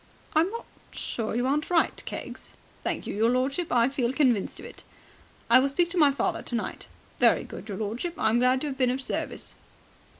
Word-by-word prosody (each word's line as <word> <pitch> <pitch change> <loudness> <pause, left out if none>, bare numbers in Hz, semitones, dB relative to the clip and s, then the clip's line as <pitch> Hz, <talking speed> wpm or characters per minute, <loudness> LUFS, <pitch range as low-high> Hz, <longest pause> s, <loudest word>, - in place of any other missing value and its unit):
" - - -26
I'm 325 +4 +4
not 465 +3 -6 0.2
sure 220 -2 -3
you 245 +1 +1
aren't 290 +3 0
right, 345 -2 +3
Keggs." - - -7 0.3
"Thank - - -2
you, - - -4
your 220 +3 +2
lordship. 270 +7 0
I 235 -1 +4
feel 260 -3 0
convinced 255 -8 +1
of - - -9
it." - - -11 0.6
"I 245 +2 +7
will 275 +2 +2
speak 340 +5 +1
to 365 - -3
my 295 -3 +6
father 270 -3 -1
tonight." 235 - -4 0.3
"Very - - +5
good, 215 - -9
your 195 - -4
lordship. 230 - -3
I 220 - +2
am 235 - +3
glad 255 +1 +3
to 300 - -1
have 270 0 -6
been 255 -1 +3
of 255 +2 -1
service." 270 - -4
260 Hz, 210 wpm, -27 LUFS, 235-300 Hz, 0.6 s, I